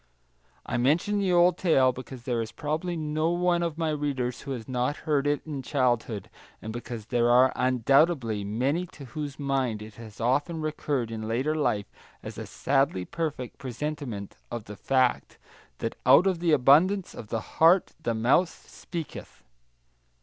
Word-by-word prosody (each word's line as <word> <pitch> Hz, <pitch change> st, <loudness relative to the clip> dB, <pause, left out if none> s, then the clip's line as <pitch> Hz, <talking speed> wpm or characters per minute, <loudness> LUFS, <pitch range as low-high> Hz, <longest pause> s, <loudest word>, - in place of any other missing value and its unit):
I -, -, -2 dB
mention 165 Hz, -, +2 dB
the 195 Hz, -2 st, +1 dB
old 175 Hz, 0 st, +4 dB
tale 135 Hz, -8 st, +4 dB
because 130 Hz, -1 st, -9 dB
there 120 Hz, -3 st, -1 dB
is 110 Hz, -, -5 dB
probably 160 Hz, +4 st, -3 dB
no 155 Hz, +1 st, 0 dB
one 175 Hz, 0 st, +1 dB
of 165 Hz, -2 st, -2 dB
my 165 Hz, -2 st, 0 dB
readers 135 Hz, -5 st, -2 dB
who 140 Hz, -, -7 dB
has 115 Hz, -4 st, -7 dB
not 125 Hz, +3 st, -1 dB
heard 145 Hz, -3 st, +1 dB
it 145 Hz, 0 st, 0 dB
in 145 Hz, -4 st, -5 dB
childhood, 120 Hz, -6 st, 0 dB, 0.3 s
and 110 Hz, -, -7 dB
because 120 Hz, -2 st, -6 dB
there 120 Hz, +1 st, +1 dB
are 125 Hz, +2 st, +5 dB
undoubtedly 130 Hz, -2 st, +2 dB
many 130 Hz, -, -1 dB
to 145 Hz, -4 st, -12 dB
whose 145 Hz, +2 st, -6 dB
mind 135 Hz, -6 st, -1 dB
it 110 Hz, 0 st, -11 dB
has 110 Hz, -2 st, -11 dB
often 145 Hz, +8 st, 0 dB
recurred 145 Hz, -6 st, -2 dB
in 110 Hz, -1 st, -5 dB
later 130 Hz, +7 st, 0 dB
life 110 Hz, -10 st, -1 dB, 0.3 s
as -, -, -7 dB
a -, -, -6 dB
sadly 135 Hz, -10 st, 0 dB
perfect 150 Hz, -, -4 dB
presentment 130 Hz, -5 st, -5 dB
of 120 Hz, -2 st, -5 dB
the 105 Hz, -, -9 dB
fact 130 Hz, +3 st, +1 dB, 0.4 s
that -, -, -3 dB
"out 135 Hz, +8 st, +7 dB
of 185 Hz, -3 st, +1 dB
the 170 Hz, -1 st, +1 dB
abundance 155 Hz, +8 st, +4 dB
of 110 Hz, -, -9 dB
the 110 Hz, 0 st, -6 dB
heart 170 Hz, +3 st, +5 dB
the 115 Hz, -6 st, -1 dB
mouth 130 Hz, +11 st, +3 dB, 0.2 s
speaketh." 165 Hz, -3 st, -8 dB
135 Hz, 165 wpm, -27 LUFS, 120-155 Hz, 0.4 s, out